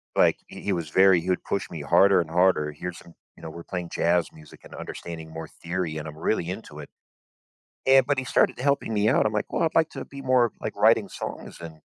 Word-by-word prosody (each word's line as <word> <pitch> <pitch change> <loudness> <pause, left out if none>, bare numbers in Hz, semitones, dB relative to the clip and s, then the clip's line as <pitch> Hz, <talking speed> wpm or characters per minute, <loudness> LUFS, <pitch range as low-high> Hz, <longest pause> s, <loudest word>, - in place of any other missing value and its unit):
like - - +4
he - - -11
he - - -1
was 85 -3 -3
very 95 +1 +5
he 90 - -5
would 90 - 0
push 100 - -3
me 80 -3 -7
harder 90 +5 +4
and 80 - -6
harder, 85 -3 +2
here's 85 +4 -7
some 85 - -16 0.2
you 85 - -16
know, 80 - -6
we're 85 +1 -9
playing 90 -2 -5
jazz 85 0 +1
music 75 -2 -16
and - - -14
understanding 80 -2 -8
more 80 0 -7
theory, 85 -2 -3
and 75 0 -6
I'm 75 0 -9
really 85 0 -1
into 90 -6 -7
it, 75 - -9 1.0
and 135 -1 +6
but 140 -2 0
he 130 - -1
started 115 - +2
helping 140 -5 0
me 105 +1 +2
out. - - +3
I'm 110 - -1
like, 105 - -3
"Well, - - +1
I'd 160 - -1
like 165 -1 +3
to 135 - -7
be 140 0 -10
more, 125 -3 +3
like, - - -5
writing - - +4
songs - - -7
and 80 -2 -10
90 Hz, 240 wpm, -25 LUFS, 80-110 Hz, 1.0 s, and